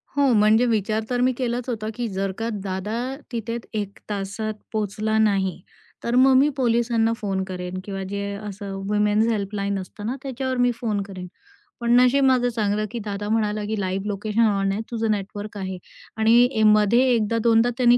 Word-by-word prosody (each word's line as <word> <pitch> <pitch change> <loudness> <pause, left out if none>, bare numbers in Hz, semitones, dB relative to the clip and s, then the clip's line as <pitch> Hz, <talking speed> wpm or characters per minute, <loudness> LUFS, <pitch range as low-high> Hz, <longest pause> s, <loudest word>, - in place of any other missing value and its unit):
हो, 280 -2 +3
म्हणजे 215 +2 +5
विचार 220 -1 0
तर 245 -1 0
मी 255 +1 +4
केलाच 245 0 -2
होता, 220 -3 -3
की 245 -1 -2
जर 195 0 -2
का 225 +1 -2
दादा 190 +2 -3 0.4
तिथे 230 -1 -3 0.2
1 200 -1 -8
तासात 205 +2 -3 0.2
पोहोचला 215 +1 -1
नाही 195 -5 +1 0.4
तर 235 +1 0
मग 265 +1 +6
मी 280 +3 +5
पोलिसांना 230 -2 +2
फोन 195 -3 -2
करेन 185 0 -5
किंवा 195 -1 -5
जे 200 0 -3 0.2
असं 200 -1 -6 0.2
वुमेन्स 210 +1 +2
हेल्पलाईन 200 -1 -2
असतं 200 +2 -8
ना 240 +4 -1
त्याच्यावर 260 -1 -3
मी 245 0 +3
फोन 220 -4 -2
करेन. 190 -2 -8 0.5
पण 235 0 +1
नशीब 255 +2 +4
माझं 255 -2 +3
चांगलं, 215 -2 0
की 240 - -4
दादा 205 -1 -4
म्हणाला, 215 -1 0
की 215 0 -2
लाईव्ह 190 +1 -2
लोकेशन 210 +2 -1
ऑन 195 -2 +1
आहे 200 +3 -2
तुझं 225 -2 0
नेटवर्क 205 +1 -4
आहे 190 -1 -4 0.4
आणि 230 +1 +4
मध्ये 215 +2 +5
1 220 -3 +1
दा 230 +2 0
2 225 -1 +5
दा 240 - +2
त्यांनी 245 -1 +5
215 Hz, 185 wpm, -23 LUFS, 200-235 Hz, 0.5 s, मग